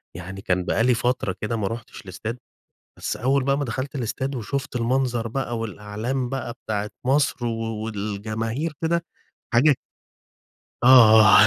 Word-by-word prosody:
يعني 95 +3 -7
كان 90 -1 0
بقى 115 - +1
لي 125 +1 +4
فترة 120 -5 0
كده 110 +2 -1
ما 100 - -1
رُحتش 115 +3 -7
الاستاد، 110 +5 -6 0.6
بس - - -2
أول 135 +3 +1
بقى 140 +1 +2
ما 145 - 0
دخلت 130 +5 -4
الاستاد 130 +2 -2
وشُفت 130 +2 -3
المنظر 120 -1 0
بقى، 120 -1 -2
والأعلام 115 +4 -3
بقى 135 -3 -3
بتاعة 105 -1 -2 0.2
مصر 135 -2 +2
و 115 -1 -3
والجماهير 110 +7 -3
كده 170 +1 +1 0.5
حاجة 140 +5 +6 1.1
آه 110 -4 +8
115 Hz, 140 wpm, -24 LUFS, 110-130 Hz, 1.1 s, آه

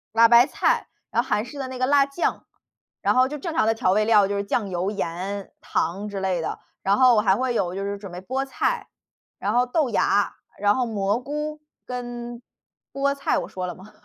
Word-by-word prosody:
辣 230 0 +7
白 240 +2 +7
菜， - - +1 0.2
然 - - +3
后 - - -10
韩 210 - +1
式 280 +4 -9
的 265 - -3
那 255 - -6
个 255 - +1
辣 280 +1 +5
酱， 280 +5 -2 0.6
然 - - +3
后 255 0 +5
就 295 +2 -5
正 325 +3 -4
常 270 -9 +2
的 225 - +4
调 225 -5 +1
味 215 +2 +3
料 210 -3 +5
就 200 - -1
是 200 - -1
酱 205 0 -1
油、 180 +2 -1
盐、 195 0 -4
糖 195 +5 -2
之 200 -2 -5
类 190 -2 0
的。 160 - -3 0.3
然 195 +1 +3
后 250 -3 +6
还 205 -2 +3
会 255 +2 0
有 180 -4 0
就 195 - -3
是 200 0 -3
准 200 -2 -9
备 180 - -6
菠 260 +7 -2
菜， 270 - -1 0.5
然 - - -1
后 245 +1 +4
豆 275 +2 +1
芽， 205 -2 +2 0.3
然 205 0 +4
后 255 - +1
蘑 205 -1 0
菇 300 +3 -4 0.3
跟 240 -1 -6 0.5
菠 280 0 +1
菜 280 - 0
我 - - -5
说 185 -1 -4
了 180 - -4
吗？ 195 +3 -14
225 Hz, 240 characters per minute, -24 LUFS, 200-255 Hz, 0.6 s, 辣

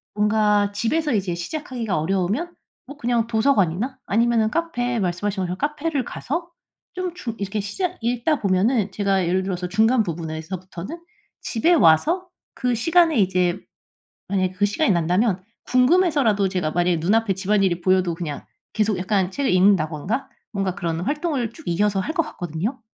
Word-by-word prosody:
뭔가 210 -1 +2
집에서 290 +8 0
이제 190 -5 0
시작하기가 230 - -3
어려우면 195 - -1 0.3
뭐 285 - -9
그냥 235 -3 0
도서관이나 225 0 +1
아니면은 230 0 +2
카페, 245 -7 -1
말씀하신 195 +2 -1
것처럼 180 0 -3
카페를 295 0 -1
가서 335 +9 -4 0.5
좀 365 -1 -3
중 240 -10 -6
이렇게 200 +1 -3
시작 360 - -3
읽다 245 +6 0
보면은 200 +2 +2
제가 195 -1 +1
예를 185 +2 +1
들어서 180 -2 -3
중간 225 +5 +3
부분에서부터는 170 - -6 0.4
집에 240 +9 +1
와서 325 - +4 0.3
그 250 -1 0
시간에 325 +5 +3
이제 185 -2 +2 0.7
만약에 185 -2 0
그 185 +2 0
시간이 210 +6 +1
난다면 180 +4 +1 0.2
궁금해서라도 255 - +3
제가 180 -5 -1
만약에 175 -1 +1
눈 180 +7 +2
앞에 225 -3 +2
집안일이 190 -2 +1
보여도 185 -1 +2
그냥 160 -4 -5 0.3
계속 215 -3 +1
약간 190 0 0
책을 275 +7 -1
읽는다든가 185 - +2 0.2
뭔가 195 -3 -1
그런 165 -3 -2
활동을 285 - -1
쭉 320 - -14
이어서 195 +3 +1
할 315 - -3
것 330 - +2
같거든요. 190 - -4
205 Hz, 370 characters per minute, -22 LUFS, 185-255 Hz, 0.7 s, 와서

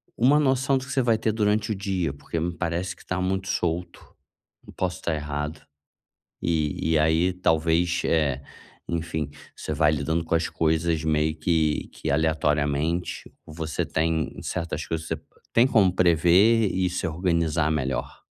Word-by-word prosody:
uma 140 +6 +4
noção 135 -1 +2
do 130 - -5
que 140 - -8
você 135 -1 +2
vai 115 -2 +3
ter 110 - 0
durante 105 0 +1
o - - 0
dia, 95 -6 -2
porque 80 +3 -5
me 85 +2 -1
parece 85 +1 -2
que - - -19
tá 90 - -2
muito 95 +1 -1
solto, 85 -1 -2 0.7
posso 90 -1 -2
estar 85 -3 -2
errado. 75 +1 -4 0.8
E 80 -1 0
e 80 - +4
aí 80 +4 +3
talvez, 85 0 +1
eh, 75 -5 +1 0.5
enfim, 80 -3 -2 0.3
você - - -5
vai 75 0 +3
lidando 80 +3 -1
com 80 - -1
as 80 +1 +1
coisas 80 0 0
meio 80 0 +1
que 80 -1 0
que - - -4
aleatoriamente, 75 +1 0
você 80 -1 -3
tem 80 0 -1
certas 85 -4 -3
coisas 80 0 -3
se 80 - -1 0.4
tem 115 +2 +5
como 105 -8 +4
prever 90 +6 +4
e 95 -1 +1
se 90 +1 -2
organizar 85 -2 0
melhor. 65 -4 -2
85 Hz, 155 wpm, -25 LUFS, 80-95 Hz, 0.8 s, tem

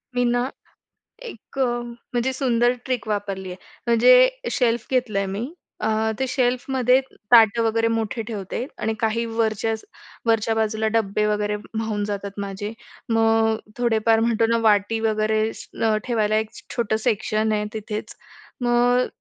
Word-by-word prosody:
मी 245 - +2
ना 245 +2 +1 0.7
एक 275 - -11
म्हणजे 240 0 -2
सुंदर 245 -2 +2
ट्रिक 255 -4 -2
वापरली 200 -3 -3
आहे. 180 - -8 0.3
म्हणजे - - +6 0.2
शेल्फ 235 -2 +1
घेतलं 245 -6 0
आहे 195 - -1
मी. 230 - -4 0.3
अ, 220 0 +1
ते 265 - +1
शेल्फमध्ये 255 0 +2 0.3
ताटं 230 -1 +6
वगैरे 225 0 +2
मोठे 225 0 -1
ठेवते. 215 +2 -4
आणि 220 0 -1
काही 230 +1 0
वरचं 225 -1 0 0.5
वरच्या 225 -1 +2
बाजूला 220 0 0
डब्बे 210 -1 +1
वगैरे 210 0 0 0.2
माऊन 220 -2 -2
जातात 200 -1 -4
माझे. 200 +1 -4 0.4
मग 225 0 +3 0.2
थोडेफार 225 -2 +2
म्हणतो 230 0 +2
ना 230 - +3
वाटी 210 +2 +2
वगैरे 215 0 +1 0.6
ठेवायला 215 -3 +1
एक 220 0 -1 0.3
छोटं 225 -3 0
सेक्शन 215 -1 +1
आहे 210 0 0
तिथेच. 215 0 -5 0.5
मग 245 +1 +3
225 Hz, 135 wpm, -23 LUFS, 215-240 Hz, 0.7 s, म्हणजे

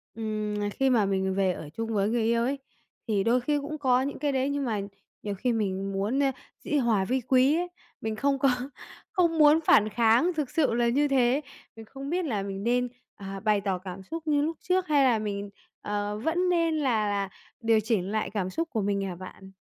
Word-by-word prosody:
ừm, 215 -2 -3
nà 205 0 -1
khi 270 +6 +1
mà 230 -5 +3
mình 190 -1 0
về 195 -1 +2
ở 155 -3 -8
chung 225 +8 -4
với 200 -1 +1
người 235 0 +1
yêu 230 +1 +2
ấy 275 +3 -1 0.5
thì 205 -3 +1
đôi 240 +4 +3
khi 290 +4 0
cũng 305 +2 -5
có 255 -3 +3
những 280 +2 -3
cái 290 0 0
đấy, 265 0 0
nhưng 285 -1 -1
mà 215 -4 -1 0.4
nhiều 205 -1 -3
khi 245 +5 0
mình 195 -3 -1
muốn, 205 +7 0
ơ, 270 - +3 0.3
dĩ 300 - 0
hòa 225 -7 +2
vi 255 +5 0
quý 260 +4 +3
ấy, 355 +1 -1 0.3
mình 220 0 -2
không 275 +4 +1
có 275 - +4 0.6
không 345 -5 +2
muốn 300 +1 +7
phản 215 -6 +5
kháng, 235 - +3
thực 300 -5 -2
sự 315 -7 +1
là 235 0 +2
như 285 +5 +2
thế. 265 0 +2 0.3
Mình 225 0 -10
không 270 +5 -8
biết 355 +2 0
là 215 -9 -1
mình 195 0 -5
nên, 245 +2 +1 0.3
à, 195 -1 -7
bày 210 -1 +2
tỏ 195 -2 -1
cảm 185 +1 -8
xúc 325 - -7
như 295 -1 +3
lúc 320 +2 -2
trước 370 0 0
hay 290 -2 +4
là 240 -4 +3
mình, 205 -1 -4 0.3
ờ, 205 0 -2
vẫn 345 +8 0
nên 335 -2 +2
là 230 -8 +1
là 200 -1 -1 0.3
điều 225 -1 +4
chỉnh 210 -3 -1
lại 215 0 -1
cảm 195 -3 -2
xúc 330 - -3
của 225 - -1
mình 200 0 0
hả 190 -2 -3
bạn? 190 +2 -11
230 Hz, 230 wpm, -27 LUFS, 205-280 Hz, 0.6 s, muốn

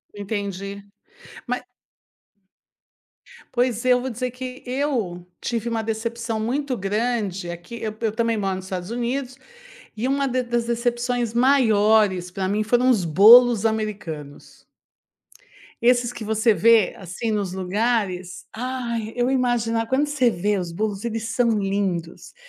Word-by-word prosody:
Entendi, 200 -1 -5 0.6
mas - - -2 1.9
Pois, 245 -1 0
eu 250 -1 +4
vou 260 - -3
dizer 250 +1 -3
que 255 0 -8
eu 245 -10 -2 0.2
tive 235 -1 -2
uma 225 -1 -1
decepção 225 +1 -3
muito 260 +4 -1
grande 200 -3 -2
aqui. 175 +7 -9
Eu 215 -1 -3
eu 225 - +1
também 230 +1 0
moro 195 -2 -1
nos 185 0 -7
Estados 185 -1 -5
Unidos, 245 +3 -3 0.6
e 235 +4 -2
uma 275 0 +1
de 255 0 -1
das 240 -1 -1
decepções 240 0 -1
maiores 215 -7 +3
pra 190 +1 -3
mim 210 +2 0
foram 245 +3 +2
os 220 -9 +3
bolos 225 +6 +7
americanos 195 -10 -5 1.2
esses 245 0 +3
que 225 - -7
você 220 +1 +2
vê, 220 +3 +4
assim, 190 +5 -4
nos 200 -4 -1
lugares, 190 -2 -1
ai, 235 -2 -3
eu 245 +1 +1
imagina 230 -3 +1
quando 275 +4 +1
você 265 -5 +2
vê 205 +1 0
os 175 -2 -4
bolos, 205 +2 -3
eles 225 -1 -3
são 235 +2 +2
lindos. 195 -4 -3
225 Hz, 135 wpm, -23 LUFS, 200-245 Hz, 1.9 s, bolos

